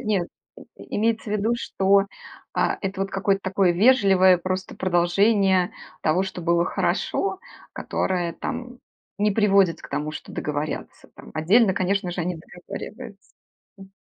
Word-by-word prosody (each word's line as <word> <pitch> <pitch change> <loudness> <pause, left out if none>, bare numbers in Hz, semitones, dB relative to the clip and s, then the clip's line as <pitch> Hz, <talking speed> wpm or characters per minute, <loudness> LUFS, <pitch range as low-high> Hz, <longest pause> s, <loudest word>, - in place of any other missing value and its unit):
нет, 205 -7 -1 0.5
и - - -7
имеется 225 +1 0
в - - -1
виду, 215 +2 +1
что, 195 -2 +2 0.5
а - - +1
это 195 -1 -4
вот 195 0 -1
какое-то 195 0 0
такое 190 -1 +2
вежливое 190 -3 +5
просто 185 +2 -4
продолжение 185 +1 +2 0.3
того, 175 +5 +2
что 190 - -6
было 170 0 +2
хорошо, 385 - -1 0.3
которое 175 -3 -2
там 250 +3 -6 0.4
не 210 0 +2
приводит 195 -5 +3
к - - -11
тому, 150 +2 -3
что - - -9
договорятся 150 +1 -4
там. - - -13
Отдельно, 190 +6 +4
конечно 190 -1 0
же, 175 - -4
они 175 0 -2
договариваются. 200 +6 -10 0.5
М. 195 0 -14
195 Hz, 140 wpm, -24 LUFS, 175-210 Hz, 0.5 s, вежливое